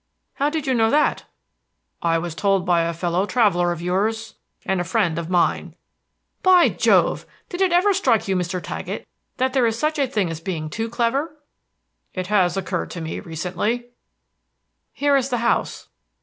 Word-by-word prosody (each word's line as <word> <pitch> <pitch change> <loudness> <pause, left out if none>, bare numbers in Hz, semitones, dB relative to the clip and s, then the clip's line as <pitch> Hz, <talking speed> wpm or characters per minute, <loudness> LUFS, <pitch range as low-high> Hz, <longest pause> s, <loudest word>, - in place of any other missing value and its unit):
"How 285 +1 0
did 310 -1 -3
you 265 - +1
know 225 -2 +3
that?" 300 +3 +1 0.8
"I 165 -1 +2
was 170 0 -4
told 195 0 +1
by 175 -2 +3
a 170 - -1
fellow 175 +3 -1
traveler 190 -8 +2
of 170 0 -5
yours, 215 +5 -1 0.3
and 190 -2 0
a - - -1
friend 170 -1 0
of 170 0 -6
mine." 180 -2 0 0.7
"By 370 -2 +6
Jove! - - +2 0.2
Did 355 +1 -5
it 380 -2 +3
ever 365 +4 +4
strike 255 - +1
you, 190 - +1
Mr. 180 0 -2
Taggett, - - -6 0.3
that 260 0 0
there 255 -4 +3
is 225 0 -1
such 305 +3 -1
a 275 - +2
thing 205 -8 -1
as 160 - -5
being 160 -4 -4
too 225 +5 -3
clever?" 270 +7 -1 0.8
"It 185 -1 -3
has 190 -2 +2
occurred 190 - -3
to 170 - -7
me 160 0 -4
recently." 185 +9 -3 1.0
"Here 285 0 +1
is 270 -1 +1
the 245 - 0
house." 235 0 -1
205 Hz, 175 wpm, -22 LUFS, 175-260 Hz, 1.0 s, By